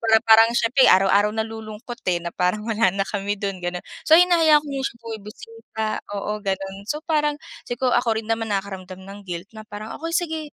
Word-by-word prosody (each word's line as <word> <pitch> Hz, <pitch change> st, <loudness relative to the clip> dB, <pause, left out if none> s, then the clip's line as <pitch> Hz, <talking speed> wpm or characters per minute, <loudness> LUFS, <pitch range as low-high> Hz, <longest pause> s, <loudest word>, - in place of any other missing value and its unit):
Para 225 Hz, -1 st, +4 dB
parang 225 Hz, +1 st, +7 dB
siyempre, 255 Hz, +3 st, +4 dB
araw-araw 200 Hz, +2 st, +4 dB
nalulungkot 220 Hz, +2 st, -6 dB
eh, 175 Hz, -1 st, +2 dB
na 170 Hz, -, -4 dB
parang 190 Hz, +4 st, -1 dB
wala 225 Hz, -3 st, +2 dB
na 195 Hz, +1 st, -1 dB
kami 205 Hz, 0 st, -2 dB
do'n 195 Hz, -2 st, -4 dB
gano'n. 175 Hz, 0 st, -4 dB, 0.2 s
So, 320 Hz, -, +9 dB
hinahayaan 325 Hz, -4 st, +5 dB
ko 275 Hz, -1 st, -4 dB
siya 235 Hz, -, -3 dB
bumibisita 220 Hz, -, -7 dB, 0.3 s
oo, 210 Hz, +1 st, -3 dB
gano'n. 195 Hz, -1 st, -3 dB
So, 300 Hz, -, -1 dB
parang, 300 Hz, -2 st, +1 dB, 0.3 s
ako 245 Hz, 0 st, +1 dB
rin 220 Hz, -, -7 dB
naman 225 Hz, 0 st, -1 dB
nakakaramdam 190 Hz, -2 st, -4 dB
ng 200 Hz, +1 st, -10 dB
guilt 175 Hz, +3 st, -5 dB
na 215 Hz, 0 st, -11 dB
parang, 210 Hz, +1 st, -7 dB
"Okey 330 Hz, +1 st, -4 dB
sige, 320 Hz, -2 st, -2 dB
220 Hz, 180 wpm, -22 LUFS, 195-255 Hz, 0.3 s, So